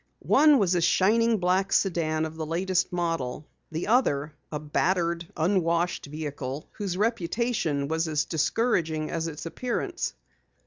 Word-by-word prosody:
One 300 Hz, -1 st, +6 dB
was 190 Hz, -6 st, +2 dB
a 175 Hz, -, +2 dB
shining 225 Hz, +7 st, +3 dB
black 185 Hz, +1 st, +1 dB
sedan 160 Hz, -4 st, +1 dB
of 160 Hz, 0 st, -7 dB
the 160 Hz, -, -4 dB
latest 180 Hz, +3 st, 0 dB
model, 165 Hz, -6 st, -2 dB, 0.2 s
the 160 Hz, +2 st, -3 dB
other, 155 Hz, -, +2 dB, 0.2 s
a 150 Hz, -, -3 dB
battered, 170 Hz, +2 st, 0 dB
unwashed 170 Hz, -1 st, +1 dB
vehicle 145 Hz, -2 st, -5 dB
whose 195 Hz, -4 st, -4 dB
reputation 205 Hz, -7 st, 0 dB
was 160 Hz, +2 st, 0 dB
as 155 Hz, -1 st, 0 dB
discouraging 160 Hz, -3 st, 0 dB
as 165 Hz, -1 st, -2 dB
its 155 Hz, 0 st, -7 dB
appearance. 255 Hz, -, -3 dB
170 Hz, 135 wpm, -27 LUFS, 155-195 Hz, 0.2 s, One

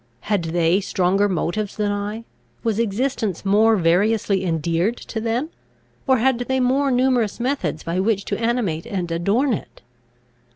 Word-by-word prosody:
Had 205 Hz, -5 st, -1 dB
they 170 Hz, +3 st, +2 dB
stronger 195 Hz, +1 st, +1 dB
motives 190 Hz, +3 st, -2 dB
than 210 Hz, -1 st, 0 dB
I? 205 Hz, +2 st, -4 dB, 0.4 s
Was 225 Hz, -2 st, 0 dB
existence 225 Hz, -3 st, -1 dB
more 215 Hz, +3 st, +4 dB
variously 195 Hz, +2 st, +2 dB
endeared 170 Hz, +6 st, 0 dB
to 220 Hz, -, -6 dB
them? 235 Hz, +7 st, -1 dB, 0.6 s
or 260 Hz, -1 st, +4 dB
had 255 Hz, +1 st, +2 dB
they 260 Hz, +2 st, -1 dB
more 265 Hz, +3 st, +2 dB
numerous 250 Hz, -4 st, +1 dB
methods 250 Hz, -, -2 dB
by 170 Hz, +2 st, -2 dB
which 200 Hz, 0 st, 0 dB
to 200 Hz, -, -3 dB
animate 230 Hz, -9 st, -1 dB
and 185 Hz, -6 st, -3 dB
adorn 205 Hz, +11 st, +1 dB
it? 200 Hz, -, -7 dB
210 Hz, 150 wpm, -21 LUFS, 185-240 Hz, 0.6 s, more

